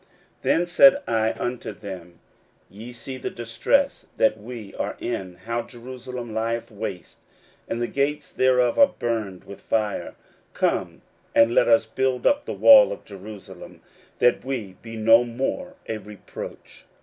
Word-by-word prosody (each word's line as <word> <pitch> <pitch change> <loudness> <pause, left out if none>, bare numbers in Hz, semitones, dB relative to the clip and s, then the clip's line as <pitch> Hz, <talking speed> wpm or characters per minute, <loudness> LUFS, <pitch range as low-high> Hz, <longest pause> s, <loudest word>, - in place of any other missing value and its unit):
16:002:017 - - -34 0.3
Then 175 - +2
said 275 +11 +6
I 110 0 +1
unto 120 -1 -4
them, 90 -4 -10 0.5
Ye 110 +5 -9
see 125 +2 -7
the - - -4
distress 125 - 0
that 110 -1 +3
we 110 -2 -9
are - - -4
in, 90 -2 -4
how 115 +1 -1
Jerusalem 125 -1 -8
lieth 115 +1 -2
waste, 100 -4 -7 0.5
and 115 - -3
the 120 - -1
gates 140 +2 -1
thereof 130 - +2
are 280 - +5
burned 110 -6 -3
with 100 - -11
fire: 105 -2 -2 0.4
come, - - -1 0.3
and 115 +1 +5
let - - +4
us 115 -1 +5
build 130 +2 -1
up 285 0 +3
the - - -4
wall 275 -2 +8
of - - -7
Jerusalem, 100 0 -11 0.4
that 120 - +3
we 120 -8 -4
be 115 -1 -9
no 115 +2 +5
more 135 - -3
a 110 -1 -3
reproach. 105 -1 -10
115 Hz, 150 wpm, -24 LUFS, 110-130 Hz, 0.5 s, wall